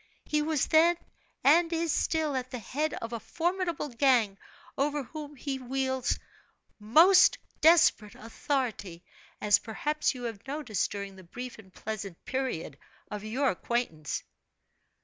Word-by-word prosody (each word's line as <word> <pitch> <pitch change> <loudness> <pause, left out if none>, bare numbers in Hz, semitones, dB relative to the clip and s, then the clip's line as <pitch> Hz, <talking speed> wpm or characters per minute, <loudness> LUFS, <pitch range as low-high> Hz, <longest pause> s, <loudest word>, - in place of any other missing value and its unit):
He 300 0 +1
was 305 -1 +1
then, 335 +2 +5 0.5
and 330 +4 +5
is 330 -1 0
still, 310 -3 0
at 255 -1 -3
the 255 - -5
head 290 +7 -2
of 230 +1 -6
a 230 - -3
formidable 345 - -2
gang, 235 -6 +2 0.4
over 290 +1 0
whom 295 +2 -8
he 270 0 -4
wields 260 0 -1 0.6
most 325 - +6 0.2
desperate 315 -10 +5
authority 225 -7 -3 0.4
as 205 -1 +4
perhaps 300 +6 -1
you 250 - -7
have 230 0 -6
noticed 270 - -1
during 200 -1 -6
the 185 - -12
brief 245 +7 -8
and 190 -3 -15
pleasant 200 -4 -6
period 255 - -3 0.3
of 210 -1 -5
your 255 +6 +1
acquaintance." 175 -8 -2
260 Hz, 135 wpm, -29 LUFS, 215-300 Hz, 0.6 s, most